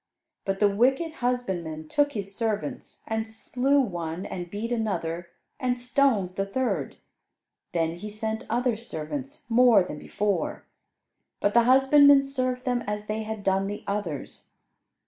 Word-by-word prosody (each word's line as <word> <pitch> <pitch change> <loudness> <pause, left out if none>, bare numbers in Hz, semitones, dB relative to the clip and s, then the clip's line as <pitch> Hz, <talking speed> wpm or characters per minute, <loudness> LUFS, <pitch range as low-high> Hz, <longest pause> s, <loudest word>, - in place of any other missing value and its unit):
But 195 0 -1
the 210 - +5
wicked 265 +10 +1
husbandmen 180 -11 -2
took 290 - +2
his 200 -3 -4
servants, 215 -1 -3
and 220 0 -2
slew 255 +5 +1
one, 175 -7 -2
and 175 -1 -5
beat 215 +5 -4
another, 175 -7 -2 0.3
and 250 -1 0
stoned 245 -7 +2
the 195 - +1
third. 195 - -2 0.7
Then 165 -1 0
he 210 +4 -6
sent 220 +1 -4
other 240 0 +1
servants, 260 - -6
more 235 -4 +6
than 150 -4 -7
before, 205 +5 -2 0.8
but 205 - +1
the 235 -1 +5
husbandmen 275 +2 +7
served 255 -2 -2
them 245 -2 0
as 210 0 -3
they 215 +1 -2
had 220 -1 -5
done 195 0 +2
the 205 +1 -5
others. 200 -8 -5
220 Hz, 145 wpm, -26 LUFS, 195-250 Hz, 0.8 s, husbandmen